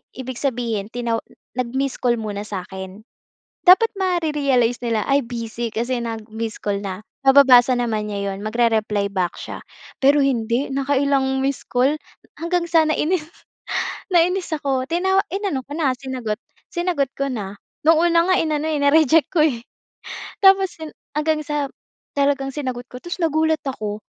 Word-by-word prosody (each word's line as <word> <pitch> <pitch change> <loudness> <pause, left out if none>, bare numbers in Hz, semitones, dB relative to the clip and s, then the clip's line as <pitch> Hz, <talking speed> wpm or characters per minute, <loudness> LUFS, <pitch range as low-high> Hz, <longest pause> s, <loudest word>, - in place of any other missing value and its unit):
ibig 260 -1 -6
sabihin 230 -6 -1
tinaw 235 -1 -2 0.4
nag-missed 260 +2 -1
call 240 -1 +2
muna 210 -2 -5
sa'kin. 190 +1 -7 0.6
Dapat 375 +5 +7
mare-realize 295 -10 +1
nila, 225 -3 0
ay, 275 -1 +3
busy 230 -1 -4
kasi 240 +3 -1
nag-missed 225 -1 -5
call 200 -1 -1
na, 190 -1 -4 0.2
mababasa 265 -2 +7
naman 220 -4 -1
niya 200 0 -2
'yon, 195 +2 -7
magre-reply 215 -2 +1
back 185 -2 -2
siya. - - -7 0.3
Pero 280 +2 +4
hindi, 245 -1 +1
nakailang 275 -1 +1
missed 270 0 -1
call, 260 +4 +3 0.4
hanggang 340 0 -1
sana 320 -2 +4
nainis, 315 +1 0 0.9
nainis 350 +1 +2
ako, 275 -4 0
tina 375 +6 +1
inano 380 -10 -2
ko 285 - -10
na, 290 -4 0
sinagot 250 -5 -4 0.3
sinagot 345 -6 0
ko 275 -1 -1
na. 205 -4 -5 0.3
Noong 330 +1 +5
una 335 - +4
nga 370 - +4
inano, 310 -1 0
eh, 310 - 0
na-reject 305 +2 +4
ko, 345 - +2
eh. 235 -4 -5 0.8
Tapos 385 -2 +5
'yon 315 - -5 0.2
hanggang 305 +1 0
sa 295 -2 -2 0.5
talagang 280 -1 +1
sinagot 255 -4 -4
ko, 250 0 -11
tas 350 +1 -5
nagulat 315 -1 +2
ako, 215 -6 -3
265 Hz, 145 wpm, -21 LUFS, 230-310 Hz, 0.9 s, Dapat